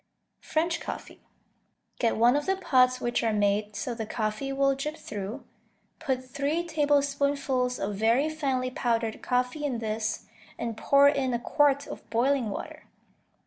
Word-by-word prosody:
French 330 +2 -1
Coffee - - -7 0.8
Get 230 -2 +2
one 240 +3 +5
of 290 +3 -1
the 385 - +2
pots 255 -9 +3
which 240 -1 0
are 225 - +1
made 205 0 +1
so 245 - -3
the 225 -2 -5
coffee 215 +6 -2
will 275 0 +2
drip 300 +4 -4
through; 210 +6 -6 0.6
put 260 -4 -2
three 280 +6 -1
tablespoonfuls 280 -4 +1
of 200 0 -3
very 230 +7 +3
finely 270 -5 -1
powdered 230 -3 -1
coffee 250 +4 -1
in 270 -5 -1
this, 215 -1 -3 0.3
and 230 -1 -3
pour 280 +5 +5
in 270 -3 +1
a - - -1
quart 285 +2 +2
of - - -10
boiling 250 0 +1
water. - - -7
255 Hz, 150 wpm, -27 LUFS, 230-285 Hz, 0.8 s, one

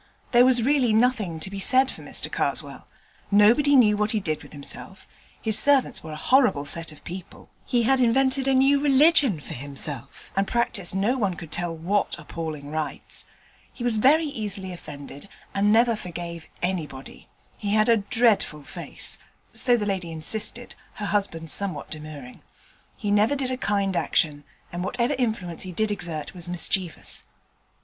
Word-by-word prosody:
There 245 0 +6
was 250 -2 +4
really 260 -3 +3
nothing 220 -8 +1
to 190 - -2
be 200 - -5
said 260 +6 +3
for - - -11
Mr - - -3
Karswell. - - -3 0.4
Nobody 235 +8 +5
knew 215 -5 +6
what 210 +1 0
he 215 - +1
did 155 -6 -3
with - - -13
himself: 150 +6 -5 0.3
his 220 -1 +3
servants 285 -2 +3
were 155 -1 -7
a - - -5
horrible 200 - +3
set 165 +2 0
of 155 - -15
people; 180 +1 -10 0.2
he 240 -1 +2
had 265 +3 +3
invented 265 +2 +2
a 270 - +3
new 275 +2 +4
religion 280 - +4
for - - -9
himself, 140 +1 -5
and 195 0 +1
practised 210 -6 +1
no 225 +7 +1
one 195 -5 0
could 165 -2 -10
tell 175 -1 -2
what 190 +5 0
appalling 155 -2 -6
rites; 155 -1 -2 0.5
he 240 - -8
was 240 -2 +1
very 295 +8 +4
easily 205 -8 -4
offended, 145 +1 -10 0.2
and 205 +1 +2
never 230 +1 +4
forgave 170 -4 -7
anybody; 155 -7 -4 0.3
he 205 0 -2
had 215 0 +3
a 230 -1 +5
dreadful 205 -7 +1
face - - -4 0.3
(so 245 -1 +4
the 210 - -2
lady 190 -4 -2
insisted, 215 +9 -2 0.2
her 210 - -5
husband 180 -6 -1
somewhat 185 -8 -2
demurring); 150 -5 -8 0.6
he 205 - -2
never 210 +7 +3
did 265 -2 -1
a - - 0
kind 200 -5 0
action, 145 -4 0 0.3
and 175 +1 -3
whatever 245 +7 0
influence 210 -9 -2
he 185 - -5
did 215 +4 0
exert 170 -6 -3
was 175 -2 -7
mischievous. 175 0 0
200 Hz, 170 wpm, -25 LUFS, 165-240 Hz, 0.6 s, There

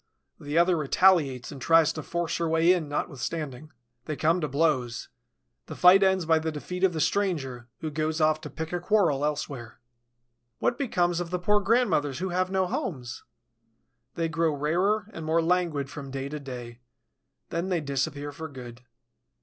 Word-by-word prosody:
The 145 +2 -3
other 175 +1 +4
retaliates 150 -4 +3
and 140 -3 -9
tries 165 +1 +4
to 155 - -5
force 170 +2 -2
her 170 -1 -1
way 165 +2 +4
in 165 -5 -2
notwithstanding. 145 +1 -4 0.3
They 155 - -3
come 165 +4 +2
to 150 - 0
blows. 130 -5 0 0.6
The - - -7
fight 180 +2 +7
ends 190 -2 +3
by 160 0 +4
the 160 0 -2
defeat 180 +5 -6
of 190 -2 +4
the 160 - -3
stranger, 145 -10 -1
who 155 -1 -3
goes 155 +1 -1
off 155 0 +2
to 150 - -7
pick 160 +4 -6
a 175 - 0
quarrel 175 -7 +2
elsewhere. 140 -6 -4 0.8
What 240 - 0
becomes 175 -10 +1
of 175 -1 -4
the 180 - -1
poor 210 +4 +2
grandmothers 195 - +1
who 190 +1 -3
have 185 +1 0
no 190 0 +1
homes? 130 -9 -4 0.9
They 165 -1 0
grow 165 -1 0
rarer 185 +9 +1
and 165 - -7
more 160 +1 +2
languid 165 -4 +1
from 140 -1 -8
day 135 +1 -4
to 150 +1 -5
day; 125 -3 -8 0.7
then 170 +3 -2
they 180 -2 +1
disappear 145 0 -3
for 160 +3 -7
good. 125 -4 -10
160 Hz, 175 wpm, -27 LUFS, 145-180 Hz, 0.9 s, fight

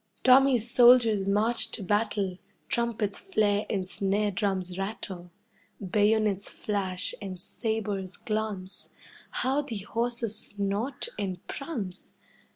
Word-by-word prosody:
Tommy's 255 -3 +5
soldiers 240 -5 +6
march 215 +4 +2
to 210 - -2
battle, 200 -2 0 0.3
Trumpets 230 -4 -1
flare 210 - +1
and 190 -2 -1
snare 200 +2 0
drums 190 -2 -1
rattle. 195 -3 -5 0.5
Bayonets 205 0 +2
flash, 190 -3 -2
and 190 -3 -6
sabres 205 -3 -3
glance 210 -3 -3 0.4
How 270 +3 0
the 250 -7 -5
horses 230 +2 -1
snort 205 +5 -1
and 185 -3 -4
prance! 225 - -5
205 Hz, 105 wpm, -28 LUFS, 195-230 Hz, 0.5 s, soldiers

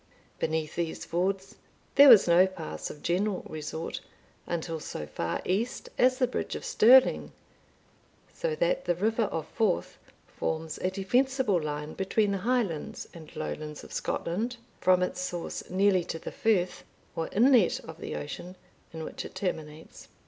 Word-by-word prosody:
Beneath 155 -1 -1
these 170 -2 -3
fords, 190 +3 -2 0.4
there 280 0 +9
was 220 -7 +9
no 175 +2 +6
pass 80 - -6
of 150 - -10
general 185 +3 0
resort 155 +1 -5 0.5
until 165 -1 -3
so 75 - -6
far 85 +3 -3
east 215 +7 -1
as 255 +1 +4
the 260 - +3
bridge 250 - -3
of - - -6
Stirling; 255 +4 +5 1.0
so - - -2
that - - 0
the 175 - +1
river 220 +5 +1
of 160 -5 -4
Forth 220 -6 0 0.3
forms 160 0 -4
a 185 - 0
defensible 245 +1 +1
line 150 0 -4
between 200 +2 +1
the 195 - -1
Highlands 210 -8 -1
and 160 -3 -11
Lowlands 150 -1 -5
of - - -11
Scotland, 225 +9 -2 0.2
from 185 0 +4
its 180 0 -2
source 175 -2 -5
nearly 190 0 +3
to 165 - -4
the - - -7
Firth, 190 -5 0 0.3
or 165 - -2
inlet 235 -3 +4
of 160 0 -11
the - - -5
ocean, 175 +5 -6 0.4
in 160 -1 -6
which - - -6
it - - -10
terminates. 160 -4 -5
185 Hz, 155 wpm, -28 LUFS, 160-220 Hz, 1.0 s, there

